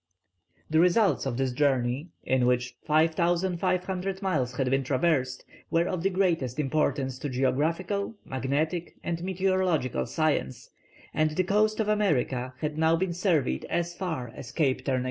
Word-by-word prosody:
The 160 +1 +2
results 175 - +3
of 120 -3 -2
this 135 -1 0
journey, 130 +1 +1 0.2
in 130 -1 +2
which 125 0 0
5500 180 +4 +1
miles 130 -10 0
had 130 0 0
been 135 0 +2
traversed, 130 -1 0 0.2
were 170 +1 +2
of 180 - -2
the 195 - +2
greatest 170 -10 0
importance 135 -3 0
to 145 - -3
geographical, 165 - 0
magnetic, 150 +6 -2
and 170 0 -3
meteorological 185 -9 0
science, 135 -3 -1 0.4
and 155 0 +2
the 185 - +2
coast 215 +3 +2
of 220 - +1
America 135 -11 0
had 150 0 -2
been 165 +3 +2
surveyed 170 -7 0
as 170 0 -1
far 160 -10 -4
as 120 - -9
Cape 140 -5 0
Turn 135 - +1
again. - - +1
155 Hz, 145 wpm, -27 LUFS, 130-180 Hz, 0.4 s, results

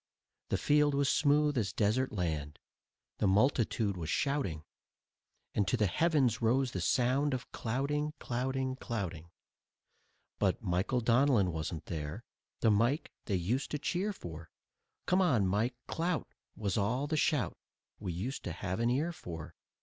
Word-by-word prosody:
The - - +1
field 145 -1 +3
was 140 0 +2
smooth 145 -2 +3
as 100 -2 -1
desert 115 +5 +1
land, 80 -7 -2 0.6
the 105 - +3
multitude 110 -1 +2
was 85 -4 -5
shouting, 140 - 0 0.9
And 100 - +1
to 125 - +2
the 105 - +3
heavens 130 - +2
rose 125 +3 +2
the 95 - -3
sound 130 - +2
of 125 - -7
clouting, 145 +6 -1
clouting, 130 +1 -2
clouting. 90 -10 -4 1.1
But - - +2
Michael 95 +8 +1
Donlin 120 -5 +4
wasn't 80 0 -4
there, 80 +6 -5 0.4
The 110 - +5
Mike 120 +9 +2
they 100 - 0
used 105 +10 -1
to 150 - -1
cheer 180 +7 -1
for. 85 - -9 0.6
"Come 185 +1 +3
on, 130 - +3
Mike, 105 +7 +1
clout!" 170 0 -2 0.2
was 105 -1 -1
all 120 +8 0
the 155 +2 -1
shout 150 - +1 0.4
We 95 -4 -3
used 100 +11 -4
to - - -2
have 95 +3 -3
an 115 +1 +2
ear 145 +8 +1
for. 85 - -8
120 Hz, 150 wpm, -32 LUFS, 95-140 Hz, 1.1 s, The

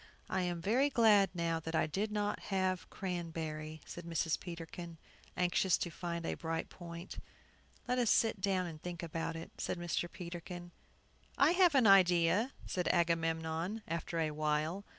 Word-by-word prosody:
"I 190 - +1
am 175 -2 -2
very 255 +8 +3
glad 215 -6 +5
now 165 -1 0
that 160 +1 -4
I 160 - +3
did 200 +7 -2
not 210 -1 -1
have 185 -2 0
cranberry," 160 -4 -4
said 175 - -8
Mrs. 165 -1 0
Peterkin, 170 -1 -7 0.4
anxious 180 +1 +3
to 175 - -3
find 170 0 -4
a - - -1
bright 165 0 -3
point. 170 0 -8 0.7
"Let 250 0 +1
us 240 -3 +2
sit 225 -3 +3
down 185 -2 +1
and 160 -3 -7
think 175 0 -6
about 165 0 -3
it," 165 - -7
said - - -2
Mr. 175 0 -2
Peterkin. 175 0 -7 0.7
"I 285 +4 +6
have 355 -3 +5
an 260 -4 +5
idea," 185 +3 +5
said 180 -2 -2
Agamemnon, 165 +3 0
after 165 +1 -3
a 155 -1 +1
while. 155 +5 -1
175 Hz, 160 wpm, -34 LUFS, 165-195 Hz, 0.7 s, I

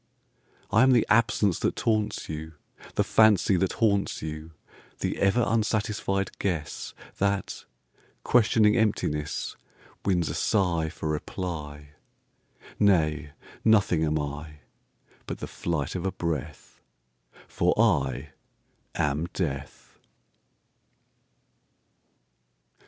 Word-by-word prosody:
I 105 +3 +5
am 130 0 +6
the 120 - +4
absence 110 -5 +3
that - - 0
taunts 110 -2 -1
you, 80 +1 -6 0.4
The - - +3
fancy 105 -4 +4
that 95 +1 0
haunts 100 -7 +1
you; 80 0 -6 0.5
The - - -2
ever 100 +5 +3
unsatisfied 105 -2 0
guessThat, 95 +3 -3 0.6
questioning 110 -2 +4
emptiness, 75 -9 -1 0.5
Wins 90 -4 +1
a - - -3
sigh 85 -6 +1
for 80 - -6
reply. 75 -2 -5 0.9
Nay, 75 -7 +2 0.3
nothing 100 -7 +4
am 75 0 +1
I,But 75 +1 -9
the - - -5
flight 80 -5 -3
of 90 - -3
a 95 - 0
breath—For 65 -7 -5
I 65 +2 +2 0.7
am 75 +2 0
Death! 70 -7 -5
85 Hz, 90 wpm, -27 LUFS, 75-105 Hz, 0.9 s, am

